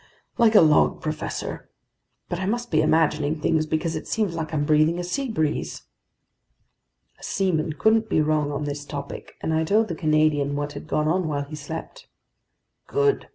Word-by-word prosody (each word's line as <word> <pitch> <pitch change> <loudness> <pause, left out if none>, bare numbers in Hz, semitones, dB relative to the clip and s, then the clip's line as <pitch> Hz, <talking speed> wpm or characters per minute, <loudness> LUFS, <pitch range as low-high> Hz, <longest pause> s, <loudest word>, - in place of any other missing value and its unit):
"Like 225 -2 +5
a - - +9
log, 155 -2 +4
professor. 155 0 -5 0.6
But 175 - -3
I 190 - -2
must 240 +3 -2
be 155 -1 +4
imagining 155 -1 +2
things, 155 0 +1
because 160 +1 -1
it 155 - -5
seems 210 -6 0
like 160 -2 -4
I'm 150 -2 0
breathing 155 +2 +3
a 175 - -3
sea 265 +9 -2
breeze!" 160 -8 -2 1.4
A - - -17
seaman 165 -5 0
couldn't 220 +8 +2
be - - +2
wrong 155 -1 +1
on 145 +1 -3
this 145 0 -4
topic, 140 -1 -7
and 160 - -1
I 160 0 +2
told 215 +6 +2
the - - -2
Canadian 155 -3 +2
what 145 0 -3
had 145 +2 -9
gone 150 -1 0
on 175 +2 +1
while 145 -2 -1
he 145 +2 -8
slept. 150 +2 -8 0.8
"Good!" 430 -1 +1
155 Hz, 180 wpm, -24 LUFS, 150-180 Hz, 1.4 s, a